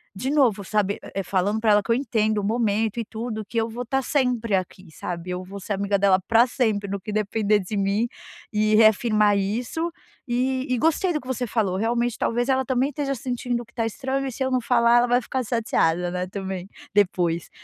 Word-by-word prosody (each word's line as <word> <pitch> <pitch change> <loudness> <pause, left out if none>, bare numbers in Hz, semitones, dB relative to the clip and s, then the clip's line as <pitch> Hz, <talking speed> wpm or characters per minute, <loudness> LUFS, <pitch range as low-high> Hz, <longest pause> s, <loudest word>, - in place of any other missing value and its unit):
de 255 +8 -2
novo, 245 -9 +3
sabe, 205 0 0 0.2
é, 195 - -1
falando 200 +4 0
pra 220 -1 +3
ela 205 -1 +4
que 230 - -2
eu 230 - +5
entendo 220 -5 0
o - - -7
momento 220 0 0
e 230 - -2
tudo, 220 -1 -5
que 230 - -6
eu 225 - -1
vou 240 +2 -5
estar 270 +3 0
sempre 250 -6 0
aqui, 185 -1 -4
sabe. 175 +2 -6
Eu 180 0 -3
vou 195 +2 -9
ser 205 - -3
amiga 200 0 0
dela 190 -1 +4
para 230 +2 +5
sempre, 215 -5 0
no 200 0 -3
que 210 +3 -6
depender 215 0 +1
de 200 +2 -4
mim, 200 +4 +1 0.4
e 215 -1 +2
reafirmar 215 -1 +4
isso. 240 - -2 0.4
E 255 +2 0
e 255 - +1
gostei 325 +5 +2
do 300 - -2
que 255 - -14
você 255 -1 -2
falou. 200 -5 0
Realmente, 235 +2 0
talvez 240 +3 0
ela 265 0 +2
também 260 +2 +1
esteja 285 -1 -2
sentindo 245 -1 -3
o - - -10
que 235 - -25
está 230 -2 -2
estranho. 265 +4 -2
E, 265 - -3
se 265 - -3
eu 260 - -1
não 255 - +2
falar, 235 0 +4
ela 240 0 +4
vai 245 +1 +3
ficar 260 +3 -3
chateada, 180 -7 +1
né. 180 0 -3
Também 190 -1 -5 0.3
depois. 175 -4 +1
220 Hz, 220 wpm, -24 LUFS, 200-245 Hz, 0.4 s, eu